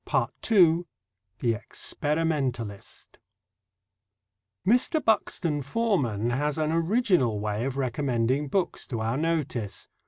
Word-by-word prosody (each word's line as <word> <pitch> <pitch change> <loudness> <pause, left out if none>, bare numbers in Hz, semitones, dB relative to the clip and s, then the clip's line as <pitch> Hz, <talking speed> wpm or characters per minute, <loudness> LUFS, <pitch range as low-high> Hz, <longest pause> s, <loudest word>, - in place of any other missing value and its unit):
(2) 175 -6 +4 0.5
THE 115 -2 +2
EXPERIMENTALIST 135 -3 -3 1.5
Mr. 250 - +3
Buxton 170 -8 +1
Forman 135 - 0
has 145 +4 0
an 155 0 0
original 165 - +2
way 105 +2 -2
of 135 0 -3
recommending 130 +1 0
books 180 +5 -1
to 115 - -3
our 110 +2 -1
notice. 145 -9 -2
145 Hz, 95 wpm, -27 LUFS, 120-165 Hz, 1.5 s, 2